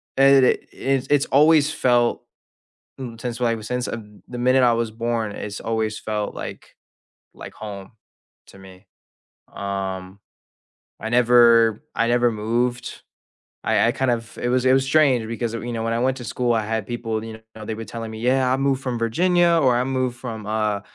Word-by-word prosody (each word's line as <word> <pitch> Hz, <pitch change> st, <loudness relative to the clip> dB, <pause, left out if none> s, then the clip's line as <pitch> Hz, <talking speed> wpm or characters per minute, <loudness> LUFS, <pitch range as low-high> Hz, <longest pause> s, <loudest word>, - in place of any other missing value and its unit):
and 135 Hz, -1 st, +6 dB
it -, -, +1 dB
i -, -, -22 dB
it's 135 Hz, -1 st, -1 dB
it's 145 Hz, -1 st, +3 dB
always 155 Hz, +1 st, +4 dB
felt, 120 Hz, -1 st, +1 dB, 0.8 s
n 120 Hz, -3 st, -7 dB
since, 120 Hz, 0 st, -5 dB
well, 120 Hz, -, +1 dB
I 115 Hz, -, +1 dB
was 110 Hz, -1 st, -8 dB
since, 125 Hz, 0 st, -2 dB
uh, 110 Hz, -, -4 dB, 0.3 s
the 125 Hz, -, -7 dB
minute 130 Hz, +1 st, +3 dB
I 120 Hz, -1 st, +5 dB
was 115 Hz, -1 st, -1 dB
born, 115 Hz, -1 st, -2 dB
it's 105 Hz, 0 st, -6 dB
always 110 Hz, -1 st, -2 dB
felt 105 Hz, -1 st, -3 dB
like -, -, -8 dB, 0.6 s
like -, -, -10 dB
home 100 Hz, -1 st, -9 dB, 0.6 s
to -, -, -15 dB
me. 95 Hz, -1 st, -15 dB, 0.7 s
Um, 95 Hz, -1 st, -5 dB, 0.8 s
I 110 Hz, -, -4 dB
never 120 Hz, -1 st, +5 dB
I 115 Hz, 0 st, +1 dB
never 120 Hz, 0 st, +3 dB
moved. 120 Hz, +3 st, -2 dB, 0.6 s
I -, -, +2 dB
I 120 Hz, -, +3 dB
kind 130 Hz, -2 st, 0 dB
of 115 Hz, -1 st, -4 dB
it 120 Hz, -, -2 dB
was 125 Hz, 0 st, +1 dB
it 130 Hz, -, +5 dB
was 135 Hz, 0 st, +3 dB
strange 135 Hz, -5 st, +3 dB
because 115 Hz, 0 st, -3 dB
of 115 Hz, -, -6 dB
you 120 Hz, -, -4 dB
know, 115 Hz, -, -3 dB
when 115 Hz, 0 st, -1 dB
I -, -, 0 dB
went 130 Hz, +2 st, 0 dB
to 125 Hz, -, -8 dB
school, 120 Hz, +2 st, 0 dB
I 110 Hz, -2 st, +1 dB
had 110 Hz, -1 st, -2 dB
people, 115 Hz, -2 st, -3 dB
you 110 Hz, 0 st, -9 dB, 0.2 s
know, 110 Hz, -, -9 dB
they 110 Hz, -, -3 dB
were 115 Hz, +1 st, -7 dB
telling 115 Hz, -1 st, -7 dB
me, 110 Hz, -, -8 dB
"Yeah, 130 Hz, +1 st, +2 dB
I -, -, +1 dB
moved 135 Hz, -1 st, 0 dB
from 125 Hz, -3 st, -3 dB
Virginia," 170 Hz, +9 st, +2 dB
or 130 Hz, -4 st, +3 dB
"I 125 Hz, -, +1 dB
moved 130 Hz, -2 st, -2 dB
from, 115 Hz, -4 st, -7 dB
uh 105 Hz, -1 st, -1 dB
120 Hz, 200 wpm, -22 LUFS, 110-130 Hz, 0.8 s, and